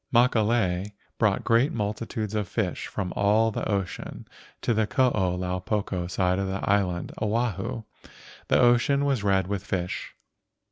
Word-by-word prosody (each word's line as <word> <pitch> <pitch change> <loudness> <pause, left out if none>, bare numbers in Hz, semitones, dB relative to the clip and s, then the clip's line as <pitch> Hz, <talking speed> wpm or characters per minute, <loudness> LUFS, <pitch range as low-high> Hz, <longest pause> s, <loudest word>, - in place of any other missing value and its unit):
Makalei 110 -5 +2 0.3
brought 105 -4 +2
great 115 +5 +3
multitudes 110 0 -3
of 105 -3 -1
fish 100 -3 -2
from 95 -4 -4
all 110 +3 +3
the - - -3
ocean 100 -3 -3 0.4
to 120 - +2
the 110 -1 +1
Koo 130 +1 +3
lau 90 -2 -1
poko 95 -2 -2
side 90 0 +1
of 100 - -1
the 95 0 -3
island 95 -4 +1
Oahu. 115 0 -1 0.6
The - - +3
ocean 125 +4 +4
was 135 -5 +1
red 95 -2 +2
with 100 0 -3
the - - -20
fish. 90 -1 -3
105 Hz, 150 wpm, -26 LUFS, 95-115 Hz, 0.6 s, ocean